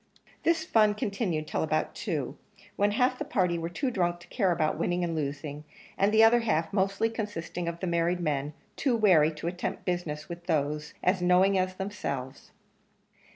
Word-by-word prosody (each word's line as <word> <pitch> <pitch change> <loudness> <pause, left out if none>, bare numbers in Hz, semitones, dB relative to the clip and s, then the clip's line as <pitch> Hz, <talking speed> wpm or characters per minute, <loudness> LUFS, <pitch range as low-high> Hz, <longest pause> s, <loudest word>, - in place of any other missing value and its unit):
This 330 -1 +1
fun 215 -6 +4
continued 200 -8 -2
till - - -2
about 155 0 0
two, 155 - -3 0.4
when 205 0 +2
half 250 +4 +1
the - - -1
party 180 -3 0
were 165 0 -3
too 255 +9 -2
drunk 175 -5 0
to - - -15
care 195 -7 +1
about 160 -2 0
winning 175 0 0
and 170 -1 -1
losing 145 0 -4 0.3
and 200 +1 +2
the 220 +1 +6
other 230 +2 +6
half, 170 -8 0
mostly 195 +2 +1
consisting 205 -6 -4
of 170 0 -3
the - - -1
married 170 0 +1
men, 150 -3 -1 0.2
too 255 -4 +1
wary 175 -8 +5
to 155 - -8
attempt 180 +1 -3
business 165 -4 -3
with 170 0 -9
those 150 -2 -1
as 185 0 +2
knowing 180 +2 +4
as 185 0 0
themselves. 185 -10 -5
175 Hz, 180 wpm, -28 LUFS, 155-205 Hz, 0.4 s, the